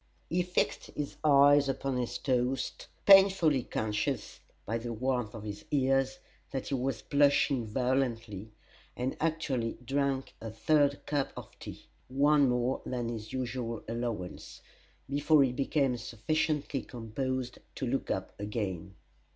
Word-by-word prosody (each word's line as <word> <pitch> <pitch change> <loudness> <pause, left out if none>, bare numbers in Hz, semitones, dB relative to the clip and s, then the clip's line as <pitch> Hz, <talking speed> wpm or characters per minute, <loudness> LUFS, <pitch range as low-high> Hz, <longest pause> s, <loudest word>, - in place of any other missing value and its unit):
He 180 +2 +2
fixed 180 -5 -1
his 145 -1 -4
eyes 145 -1 +6
upon 135 -1 -1
his 120 -1 -2
toast, 125 0 -1 0.2
painfully 190 -8 +7
conscious 105 -2 -2 0.3
by 115 +2 -1
the 120 +1 -5
warmth 125 -1 -1
of 110 - -7
his 105 -1 -6
ears 135 -1 +2 0.3
that 135 -1 -4
he - - -2
was 130 -1 -1
blushing 140 -4 +3
violently, 115 -4 -1 0.5
and 125 +2 -2
actually 145 -8 -1
drank 135 +1 -1
a 115 - -5
third 145 +5 +2
cup 145 -2 -1
of - - -8
tea - - -9 0.2
(one 140 +1 +4
more 125 +1 0
than 120 -2 -3
his 110 -2 -6
usual 120 -3 -3
allowance) 115 -5 -5 0.5
before 145 +1 +4
he 130 - +1
became 135 0 +1
sufficiently 140 +5 -1
composed 125 +2 -4 0.2
to 135 - -3
look 130 +2 -1
up - - -2
again. 100 -3 -4
130 Hz, 135 wpm, -30 LUFS, 115-140 Hz, 0.5 s, painfully